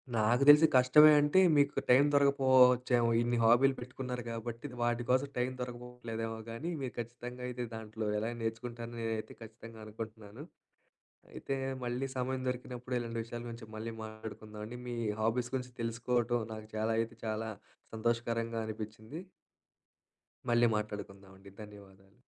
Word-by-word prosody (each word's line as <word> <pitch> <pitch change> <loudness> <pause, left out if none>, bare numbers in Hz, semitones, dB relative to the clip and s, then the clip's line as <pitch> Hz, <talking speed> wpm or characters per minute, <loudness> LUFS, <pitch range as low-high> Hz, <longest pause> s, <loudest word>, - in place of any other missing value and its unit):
నాకు 115 +4 +3
తెలిసి 150 +2 +9
కష్టమే 130 +5 +8
అంటే 145 +5 +4 0.2
మీకు 140 0 +2
టైమ్ 135 +4 +6
దొరకకపోవచ్చేమో, 130 -3 +4
ఇన్ని 120 0 +1
హాబీలు 125 +4 +5
పెట్టుకున్నారు 125 0 -5
కాబట్టి. 115 +3 -5
వాటి 120 0 +1
కోసం 130 +2 +3
టైమ్ 125 +1 0
దొరకకపోవట్లేదేమో 120 -2 -5
గానీ, 145 +10 -4
మీరు 125 -4 -4
ఖచ్చితంగా 120 +1 -6
అయితే 125 0 -4
దాంట్లో 110 -1 -5
ఎలా 110 +3 -2
నేర్చుకుంటారో 115 +1 -4
నేనైతే 115 -1 -3
ఖచ్చితంగా 115 0 -11
అనుకుంటున్నాను. 110 +2 -8 0.9
అయితే 135 - -3 0.3
మళ్ళీ 125 +3 -2
సమయం 130 +1 -1
దొరికినప్పుడు, 125 0 -5
ఇలాంటి 115 -1 -4
విషయాల 120 +1 -7
గురించి 115 -1 -8
మళ్ళీ 115 +1 -5
మాట్లాడుకుందామండి. 110 +1 -8
మీ 120 - -3 0.2
హాబీస్ 120 +2 0
గురించి 125 -1 -4
తెలుసుకోవటం, 120 +1 0
నాకు 110 0 -9
చాలా 110 +1 0
అయితే 115 +1 -3
చాలా 110 0 -2 0.5
సంతోషకరంగా 115 0 -1
అనిపించింది. 110 +6 -7 1.3
మళ్ళీ 120 0 +5
మాట్లాడుకుందాం 100 -2 -5
అండి. 100 0 -14
ధన్యవాదాలు. 100 -2 -15
120 Hz, 130 wpm, -32 LUFS, 110-125 Hz, 1.3 s, తెలిసి